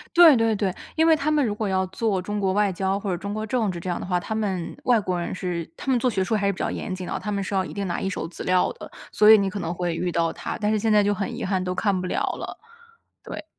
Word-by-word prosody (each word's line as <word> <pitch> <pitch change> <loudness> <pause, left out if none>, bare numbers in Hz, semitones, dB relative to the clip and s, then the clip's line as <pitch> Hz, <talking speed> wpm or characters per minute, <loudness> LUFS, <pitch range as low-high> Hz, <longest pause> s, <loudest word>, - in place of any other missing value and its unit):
对 335 -5 +9
对 225 -1 +2
对， 200 -2 0 0.2
因 320 - +3
为 325 -1 +6
他 295 +1 -2
们 295 -2 +3
如 215 - 0
果 215 - -2
要 190 0 +1
做 195 -1 -1
中 205 +3 -3
国 190 -2 +1
外 205 -1 +2
交 190 +2 -1
或 200 -1 -3
者 175 - 0
中 200 +3 -5
国 215 - -3
政 220 -1 0
治 175 - -5
这 180 +1 -4
样 175 - -1
的 - - -5
话， 180 -1 0
他 220 - -6
们 195 -6 -2
外 240 -3 +4
国 180 -3 -2
人 170 - -3
是 175 -3 -3
他 270 - -4
们 250 - +3
做 250 - +1
学 200 -5 0
术 220 +4 0
还 200 -1 0
是 200 - +2
比 - - -11
较 - - -1
严 195 - -4
谨 185 0 -6
的， - - -3
他 210 - -4
们 200 -1 -1
是 195 - -5
要 190 -1 +1
一 - - -8
定 200 -1 -2
拿 170 - -2
一 - - -1
手 195 - -3
资 175 - -8
料 180 0 +3
的， - - -10 0.2
所 210 - +4
以 - - +10
你 200 -2 0
可 205 - -5
能 170 -1 -3
会 175 -1 -2
遇 175 0 -1
到 165 -1 +1
他， - - -5
但 210 0 +1
是 215 - +2
现 220 +1 +1
在 210 -1 +5
就 205 0 +2
很 200 -1 -3
遗 - - -4
憾 185 -1 0
都 180 0 -2
看 200 -3 +1
不 185 - -3
了 - - -1
了， - - -4 0.7
对。 - - -7
200 Hz, 345 characters per minute, -24 LUFS, 185-215 Hz, 0.7 s, 以